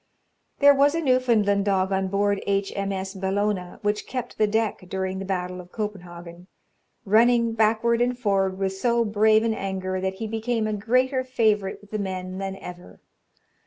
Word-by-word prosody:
There 285 0 +7
was 285 +2 +3
a - - 0
Newfoundland 235 -8 +2
dog 190 -1 +1
on 190 0 0
board 200 +1 0
H. 195 0 0
M. 200 0 -2
S. 190 0 -4
Bellona, 195 -1 -2
which 210 0 -1
kept 250 -2 -6
the 215 - +4
deck 220 0 0
during 190 0 -3
the 195 - -5
battle 180 -1 -3
of 180 0 -17
Copenhagen, 175 -4 -7 0.6
running 230 +2 +4
backward 225 +2 +2
and 245 0 +1
forward 195 -5 0
with 195 -1 -1
so 235 +3 +1
brave 215 +1 +3
an 230 -1 +1
anger, 190 -2 -3
that 190 0 -2
he 220 +3 -5
became 225 +1 -2
a 215 - -1
greater 255 +5 +1
favourite 215 -7 0
with 205 - -19
the 215 - -2
men 185 -1 -4
than 195 0 -4
ever. 180 -2 -11
205 Hz, 175 wpm, -24 LUFS, 190-225 Hz, 0.6 s, There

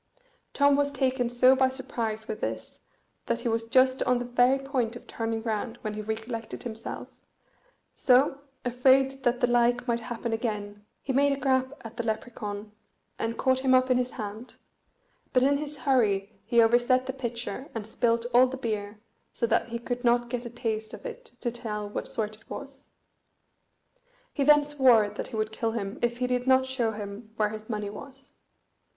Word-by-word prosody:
Tom 285 0 +5
was 285 0 +1
taken 260 -3 0
so 255 +2 +5
by 260 0 +3
surprise 230 -4 -3
with 215 0 -5
this - - -4 0.5
that 235 0 0
he 240 - -2
was 225 0 0
just 260 +1 +4
on 250 0 +3
the 245 - -3
very 245 +2 +3
point 265 -4 -2
of 240 - -10
turning 225 -1 -3
round 225 +1 -2
when 215 -2 -3
he 215 - -4
recollected 220 +2 -5
himself; 225 -2 -6 0.9
so, 270 +2 +3 0.3
afraid 260 +2 +4
that 245 -1 +1
the - - +5
like 245 +1 +3
might 235 -1 +1
happen 235 0 -4
again, 210 -3 -3 0.2
he 270 - -2
made 280 +2 +4
a 275 - -1
grab 260 0 +1
at 225 +1 -9
the 235 - -1
Lepracaun, 215 -2 -4 0.5
and 225 +1 -2
caught 260 -1 +2
him 260 -1 +4
up 255 0 +3
in 250 - +4
his 250 0 0
hand; 220 0 -7 0.8
but 255 -1 +4
in 280 +1 +3
his 295 0 -5
hurry 225 -7 +1
he 235 -1 +5
overset 240 +3 +3
the 265 - -3
pitcher, 245 +1 -5
and 220 -2 -3
spilt 230 +1 +1
all 250 +2 +7
the 265 +1 -5
beer, 210 -4 -4 0.3
so - - -1
that 230 0 +1
he 235 - -3
could 245 +1 -4
not 240 0 +3
get 245 -1 -3
a - - -7
taste 225 -2 -3
of - - -15
it - - -7
to 240 - -1
tell 215 -3 -4
what 205 - -4
sort 215 -1 -2
it 220 - -24
was. 275 -1 -9 1.4
He 280 - 0
then 295 +1 +6
swore 260 -7 +4
that 210 - -6
he - - -8
would 215 0 -1
kill 225 0 -2
him 205 0 -4
if 240 0 0
he 250 - 0
did 250 0 -1
not 260 0 +5
show 255 -4 -1
him 210 +1 -8
where 210 -1 +2
his 215 +1 -8
money 210 -2 -3
was. 270 +4 -9
240 Hz, 190 wpm, -27 LUFS, 220-260 Hz, 1.4 s, all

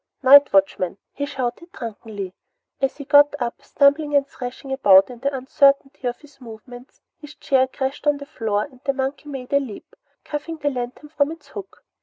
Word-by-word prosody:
Night 280 +2 +8
watchman!" 190 -1 +1 0.2
he 285 0 -4
shouted 265 +5 -4
drunkenly. 210 -4 -7 0.5
As 270 -1 0
he 285 - -8
got 290 0 +5
up, 240 -2 -4
stumbling 290 +1 +2
and 280 -1 +4
thrashing 260 0 -8
about 195 -5 +5
in 240 - -11
the 275 +3 -1
uncertainty 275 0 +1
of 245 - -4
his 285 -2 -20
movements, 245 +2 -12 0.2
his 295 0 -12
chair 260 -1 +2
crashed 265 +2 -4
to 295 - +4
the 280 - -9
floor 220 -8 -2
and 255 -3 -13
the 275 -1 0
monkey 275 +2 -4
made 265 -2 -7
a 280 - +5
leap, 270 - -9 0.3
cuffing 300 +2 -5
the 290 -2 -1
lantern 250 +3 -6
from 290 -1 0
its 325 -2 -12
hook. 395 -2 -10
270 Hz, 185 wpm, -22 LUFS, 245-290 Hz, 0.5 s, Night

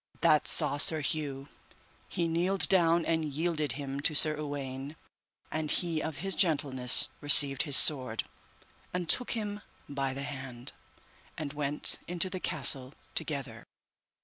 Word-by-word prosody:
That 155 -3 +2
saw 140 - +4
Sir 155 +2 +2
Hue: 140 -2 -5 0.6
he 170 -1 -3
kneeled 180 +4 +4
down 170 -2 +1
and 160 -1 -2
yielded 155 0 -3
him 140 -1 -7
to 150 +2 0
Sir 155 +1 +5
Uwaine. 140 -1 -8 0.6
And 155 -1 -4
he 165 -2 0
of 160 -2 -6
his 195 - -2
gentleness 135 -7 +3
received 140 -2 +5
his 145 -3 +4
sword, 130 -6 +4 0.7
and 180 -2 -4
took 250 +9 +1
him 210 -2 -6 0.3
by 135 -2 -5
the 140 - -7
hand, 130 -2 -7 0.7
and 145 -2 -7
went 145 0 +1
into 180 +1 -3
the 185 - -6
castle 135 -4 0 0.2
together. - - -5
150 Hz, 140 wpm, -28 LUFS, 140-165 Hz, 0.7 s, Sir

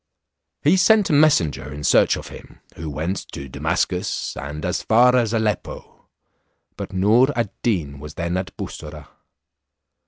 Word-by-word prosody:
He 160 +6 +4
sent 205 +1 +4
a - - +2
messenger 95 - +3
in 75 0 -7
search - - +4
of - - -9
him, - - -13 0.2
who 80 -1 -6
went 80 +7 -3 0.2
to 70 - -7
Damascus, 65 - -2
and 75 +2 -6
as 90 +1 -1
far 125 +3 +4
as 120 -4 +2
Aleppo, 110 -2 -3 0.7
but - - -7
Noor 105 +7 +4
ad 115 -4 -1
Deen 80 -11 -1
was 75 +1 -10
then 85 +1 -2
at 95 +1 -4
Bussorah. 75 -1 -8
95 Hz, 150 wpm, -21 LUFS, 75-120 Hz, 0.7 s, He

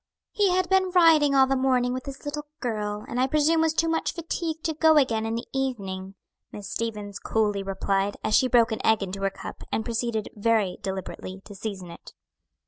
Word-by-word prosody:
"He 410 -2 +2
had 365 0 +1
been 380 0 +3
riding 325 -5 +5
all 265 -1 +7
the 270 +1 0
morning 255 -2 +2
with 255 +1 -5
his 275 +1 -8
little 295 +1 -4
girl, 210 -4 -3
and 245 - -3
I 260 - +3
presume 305 +3 +3
was 320 -1 +1
too 330 - +2
much 325 0 -1
fatigued 330 -1 -4
to 320 - 0
go 315 0 +4
again 225 -6 +2
in 225 - -2
the 235 - -4
evening," 195 -8 -3 0.4
Miss 205 -2 -8
Stevens 210 -3 -4
coolly 210 -2 0
replied, 195 +1 -1
as - - +2
she 260 - +4
broke 235 -2 +4
an 220 - -3
egg 220 -2 +3
into 195 +1 -5
her 195 - +2
cup, 195 - -9
and 220 - -1
proceeded 235 -2 -2
very 210 -3 +1
deliberately 190 0 -5
to 205 - -10
season 195 -3 -6
it. - - -13
235 Hz, 205 wpm, -26 LUFS, 205-295 Hz, 0.4 s, all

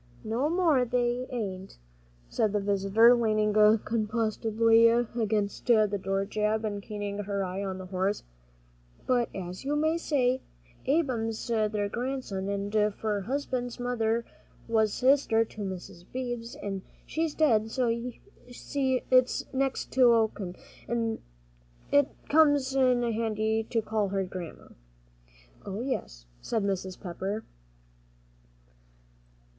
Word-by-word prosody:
"No 235 +7 0
more'n 320 -8 +2
they 245 0 0
hain't," 195 -6 -5 0.5
said 210 - 0
the 210 - +2
visitor, 200 +4 +4
leaning 215 -3 +2
composedly 220 +1 +3
against 225 -3 0
the 215 -4 +3
door 195 +1 0
jamb 215 +1 0
and 205 -1 -3
keeping 205 0 -5
her 200 -1 -2
eye 185 +2 -4
on 190 -1 -3
the 185 - -7
horse; 190 +2 -1 0.8
"but 245 -2 +2
as 180 +1 -6
you 285 +2 -1
may 315 +2 +1
say, 260 -5 +1 0.5
Ab'm's 250 -7 0
their 215 -2 +1
grandson, 200 -5 -3 0.2
for 210 -1 -2
my 195 - -10
husband's 255 -3 -2
mother 235 -2 0 0.4
was 220 -2 +2
sister 255 -3 +3
to 220 - -10
Mis' 185 -3 -6
Beebe, 245 -2 -4 0.2
an' 195 -2 -3 0.2
she's 320 -1 -2
dead, 225 -8 +3
so 250 +1 0
you 235 +2 -2 0.4
see 260 0 -1
it's 255 0 +4
next 265 0 -1
o' 230 -3 +6
kin, 185 -4 -7 0.3
an' 230 -1 -1 0.7
it 285 -1 +5 0.2
comes 290 -3 +4
in 255 -2 +3
handy 220 -1 0
to 225 -1 -1
call 215 -1 0
her 195 0 0
Grandma." 180 -3 -8 0.9
"Oh, 200 +2 -5
yes," - - -4 0.2
said 225 -3 -1
Mrs. 190 -2 -2
Pepper. 195 +4 -4
225 Hz, 125 wpm, -28 LUFS, 205-250 Hz, 0.9 s, o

